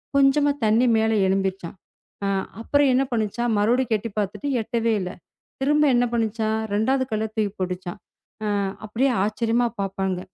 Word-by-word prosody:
கொஞ்சமா 280 +1 +4
தண்ணி 220 +4 +4
மேல 220 0 +2 0.2
எழும்பிருச்சாம். 190 -2 -1 0.5
அ - - +1 0.3
அப்புறம் 285 +4 +3
என்ன 260 +2 +3
பண்ணுச்சாம்? 235 +1 -1
மறுபடிக்கும் 230 +2 +2
எட்டி 230 - -5
பாத்துட்டு 205 +8 -3
எட்டவே 230 0 -1
இல்ல. 180 -1 -3 0.5
திரும்ப 295 +2 +3
என்ன 245 0 +3
பண்ணுச்சாம்? 220 -1 0 0.2
2வது 260 +6 +2
கல்லை 215 0 -1
தூக்கி 215 -2 0
போட்டுச்சாம்." 180 0 -4 0.5
அ - - -1 0.4
அப்படியே 230 +6 +1
ஆச்சரியமா 230 +3 +1
பாப்பாங்க. 190 -1 -2
220 Hz, 140 wpm, -23 LUFS, 200-245 Hz, 0.5 s, கொஞ்சமா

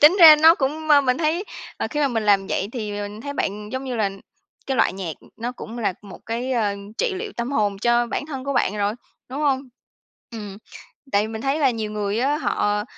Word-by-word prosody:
tính 310 +6 +8
ra 315 -2 +11
nó 325 +1 +9
cũng 310 +2 -2
ma 290 -1 +7
mình 255 -2 +1
thấy, 330 +4 0 0.3
ờ, - - -2
khi 300 - -1
mà 285 - +3
mình 230 -3 -1
làm 200 -2 +3
vậy 195 - -1
thì 215 -5 -4
mình 205 +1 -5
thấy 285 +3 -5
bạn, 210 -5 -3
giống 260 +1 -3
như 250 -2 -3
là, 205 -3 +1 0.6
cái 265 -1 -1
loại - - +3
nhạc, 185 -4 -4
ừm, - - -20
nó 240 +2 -4
cũng 235 -1 -8
là 210 -5 0
một 200 - -11
cái, 240 +3 -2
ơ, 210 -4 +1 0.2
trị 485 -5 +1
liệu 410 +2 -5
tâm 240 +4 -3
hồn 205 -5 +1
cho 240 +2 +2
bản 285 - -3
thân 270 -4 -6
của 280 - -1
bạn 210 -5 +1
rồi, 205 +1 0 0.3
đúng 275 +4 -5
hông? 275 -3 +2 0.7
Ừm, 205 -3 -7 0.5
tại 205 +2 +2
mình 220 0 -6
thấy 275 +2 0
là 275 -4 +4
nhiều 220 -2 -3
người 205 +1 -1
á, 280 +4 +2
họ 210 -6 0
240 Hz, 235 wpm, -23 LUFS, 210-280 Hz, 0.7 s, ra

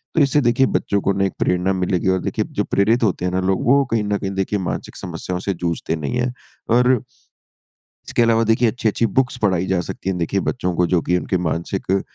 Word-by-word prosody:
तो 160 - +4
इससे 145 +1 +3
देखिए 120 +1 +3
बच्चों 100 - -1
को 100 - +1
ना 95 0 0
एक 95 - -2
प्रेरणा 90 +2 +1
मिलेगी 90 -1 -1
और 95 - +2
देखिए - - -2
जो - - +3
प्रेरित 110 +5 +2
होते 95 -4 0
हैं 90 - 0
ना 90 - 0
लोग 95 - 0
वो 140 +2 +5
कहीं 115 -2 +1
न 105 0 0
कहीं 95 -1 -4
देखिए 95 +1 -1
मानसिक 90 - -4
समस्याओं 90 +1 -5
से 100 +1 -2
जूझते 85 -2 -2
नहीं 75 - -3
है। 125 0 0 0.4
और 125 +2 +4 1.2
इसके 120 - +2
अलावा 115 0 +3
देखिए 115 +2 +3
अच्छी-अच्छी 115 0 0
बुक्स 130 +5 0
पढ़ाई 95 -5 +1
जा 95 -1 +1
सकती 95 - -5
है 95 - -2
देखिए 90 +3 0
बच्चों 90 -7 -2
को 90 - +3
जो 90 0 +2
कि 90 - +1
उनके 95 - -1
मानसिक 85 +3 -3
अ, 95 +1 +3
95 Hz, 225 wpm, -20 LUFS, 90-115 Hz, 1.2 s, वो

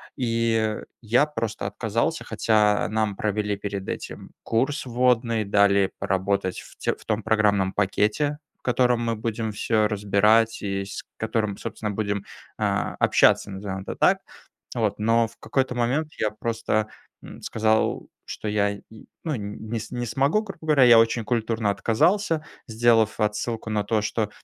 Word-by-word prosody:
И 115 -3 0 0.2
я 120 +6 +3
просто 115 -9 -4
отказался, 115 +8 -1
хотя 105 -2 +2
нам 110 -2 -1
провели 105 -1 -1
перед 100 -1 -5
этим - - -6
курс 130 +5 0
вводный, 120 -2 +2
дали 100 -1 +3
поработать 95 0 -1
в - - -16
тё - - -1
в - - -18
том 110 -1 -1
программном 100 -3 +2
пакете, 105 +9 +1 0.2
в - - -47
котором 125 -1 +2
мы 115 -1 -1
будем 110 0 -3
всё 110 0 +1
разбирать 105 +2 +3
и 100 -1 -2
с 100 - -7
которым, 105 -3 -1
собственно, 110 -2 -4
будем, 100 -1 -2 0.3
а, - - -1
общаться, 100 - +4
назовем 95 0 -5
это - - -7
так. - - +4 0.6
Вот, 110 -4 0
но 115 +1 +2
в - - -19
какой-то 130 -2 -1
момент 135 +6 0
я 110 -1 +1
просто, 110 -1 -1 0.3
м, - - -11
сказал, 110 0 0 0.2
что - - -6
я 100 -1 +1
н 100 - -12 0.4
ну, 155 -3 -1
не 105 +2 -5
не 120 -1 -3
смогу, 140 - +1
грубо 195 -5 -9
говоря. 150 -4 +4
Я 120 -2 +8
очень 115 0 +2
культурно 110 -1 0
отказался, 160 - +1 0.2
сделав 115 -1 +3
отсылку 110 +1 -2
на 105 -1 +1
то, 110 0 0
что 110 -1 -1
110 Hz, 150 wpm, -24 LUFS, 105-115 Hz, 0.6 s, Я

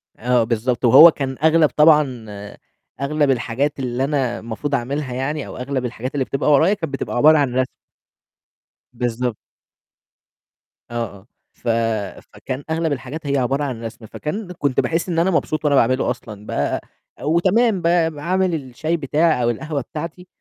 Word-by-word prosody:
آه، 125 0 +2
بالضبط، 120 +2 -1
وهو 160 +8 +9
كان 135 -3 -4
أغلب 160 -1 +5
طبعًا 150 -6 +3 0.8
أغلب 145 0 +1
الحاجات 135 +3 -1
اللي 125 0 -2
أنا 135 -4 -1
المفروض 120 +6 -3
أعملها 135 +1 -3
يعني 140 +4 -3
أو - - -9
أغلب 130 0 -3
الحاجات 125 +2 -5
اللي 140 -3 0
بتبقى 135 +3 0
ورايا 160 +7 +5
كانت 165 -8 -4
بتبقى 135 - -3
عبارة 155 +5 +6
عن 140 -4 +1
رَسم. 130 -1 +1 1.3
بالضبط. 120 -1 -2 1.6
آه، - - -7 0.2
آه، 100 - -23 0.3
ف - - -12 0.7
فكان 130 +2 -6
أغلب 160 0 0
الحاجات 140 +3 -6
هي 140 0 +1
عبارة 135 +3 0
عن 125 -5 -4
رَسم، 115 0 -8
فكان 180 - -5
كنت 145 -7 -1
باحس 165 +3 0
إن 165 -2 0
أنا 180 +3 +2
مبسوط 155 -2 -1
وأنا 145 -1 +3
باعمله 130 0 +2
أصلًا، 105 -4 -8
بقى - - -1 0.4
وتمام 190 +7 +2
بقى 170 -1 +2
باعمل 180 +4 0
الشاي 155 +4 -3
بتاعي 155 -1 +1
أو 120 - +2
القهوة 145 +5 -3
بتاعتي 165 +7 -7
140 Hz, 155 wpm, -20 LUFS, 125-160 Hz, 1.6 s, وهو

